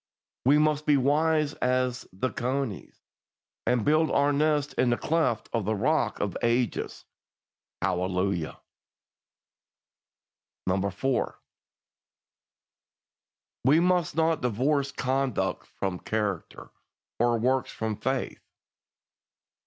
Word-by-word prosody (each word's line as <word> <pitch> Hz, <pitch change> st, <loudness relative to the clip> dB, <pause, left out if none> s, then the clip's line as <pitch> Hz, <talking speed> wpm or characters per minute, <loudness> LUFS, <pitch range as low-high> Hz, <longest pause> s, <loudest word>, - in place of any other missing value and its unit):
We 140 Hz, +3 st, +6 dB
must 150 Hz, 0 st, +1 dB
be 145 Hz, -1 st, +5 dB
wise 150 Hz, +2 st, +2 dB
as 125 Hz, 0 st, 0 dB
the 110 Hz, +8 st, -2 dB
conies, 125 Hz, -3 st, -3 dB, 0.7 s
and 120 Hz, -3 st, +2 dB
build 155 Hz, +1 st, +3 dB
our 145 Hz, +1 st, +3 dB
nest 150 Hz, -1 st, +1 dB
in 125 Hz, -, +2 dB
the 120 Hz, -, +2 dB
cleft 150 Hz, -9 st, 0 dB
of 115 Hz, -4 st, 0 dB
the 110 Hz, +1 st, 0 dB
Rock 140 Hz, +10 st, +1 dB
of 100 Hz, -3 st, -2 dB
Ages. 120 Hz, 0 st, -1 dB, 0.8 s
Hallelujah! 90 Hz, -1 st, -1 dB, 2.3 s
4. 130 Hz, +5 st, -1 dB, 2.2 s
We 140 Hz, +6 st, +5 dB
must 175 Hz, -3 st, +2 dB
not 160 Hz, -1 st, +2 dB
divorce 135 Hz, +4 st, +1 dB
conduct 135 Hz, -2 st, -1 dB
from 95 Hz, -2 st, -4 dB
character, 105 Hz, -5 st, -3 dB, 0.5 s
or 120 Hz, 0 st, +3 dB
works 130 Hz, +3 st, +1 dB
from 110 Hz, -1 st, -3 dB
faith. 130 Hz, +4 st, -2 dB
130 Hz, 100 wpm, -27 LUFS, 110-150 Hz, 2.3 s, We